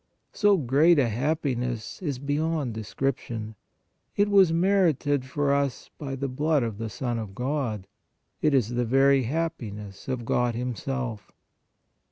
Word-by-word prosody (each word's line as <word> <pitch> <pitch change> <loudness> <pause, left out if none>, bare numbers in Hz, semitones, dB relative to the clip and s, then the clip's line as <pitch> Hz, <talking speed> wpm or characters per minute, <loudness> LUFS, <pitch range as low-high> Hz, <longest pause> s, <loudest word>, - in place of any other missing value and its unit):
So 205 -2 +4
great 150 +4 +4
a 130 -5 +3
happiness 125 - -2
is 145 -7 -2
beyond 145 -1 -1
description; 110 0 -3 0.6
it 205 0 +3
was 195 -4 +6
merited 165 -7 +2
for 140 +1 0
us 140 -3 -1
by 135 -3 -4
the 135 +1 -2
blood 145 +2 +1
of 110 -3 -4
the 115 0 -3
Son 120 +1 -3
of 100 -3 -7
God; 125 -6 -2 0.6
it 150 -2 +3
is 120 -5 +2
the 120 0 0
very 135 +3 +4
happiness 110 - -4
of 125 -3 -3
God 120 0 +1
Himself. 125 -2 -4
135 Hz, 140 wpm, -26 LUFS, 120-150 Hz, 0.6 s, was